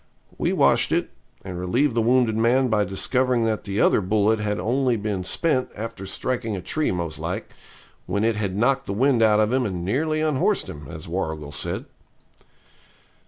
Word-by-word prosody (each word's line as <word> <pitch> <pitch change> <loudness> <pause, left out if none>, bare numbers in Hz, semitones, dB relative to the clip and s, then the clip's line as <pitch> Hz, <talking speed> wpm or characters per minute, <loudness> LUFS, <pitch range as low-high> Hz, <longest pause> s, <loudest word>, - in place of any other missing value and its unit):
We - - 0
washed - - +3
it, - - 0 0.3
and 90 -2 -5
relieved 120 +10 +1
the 115 - +1
wounded 120 -1 +3
man 125 +3 +3
by 105 -2 +2
discovering 125 +5 +1
that 110 -1 -1
the 100 +1 -2
other - - +4
bullet 105 +3 +2
had 105 0 -2
only 125 +1 +1
been 100 -3 -3
spent, 130 - 0
after 110 -3 -6
striking 120 +1 -2
a 95 - -5
tree 155 -1 -1
most 85 -3 -3
like, - - -4 0.6
when 100 - -1
it 115 -1 +2
had 100 -2 -2
knocked 135 +4 +1
the 100 - -2
wind 125 +2 +2
out 110 -1 +5
of 110 +2 +2
him 130 0 +2
and 90 -6 -3
nearly 155 - 0
unhorsed 155 -4 +1
him, 75 -2 -9
as 80 +1 -8
Warrigal 80 -4 -4
said. 75 - -3
110 Hz, 180 wpm, -23 LUFS, 95-125 Hz, 0.6 s, out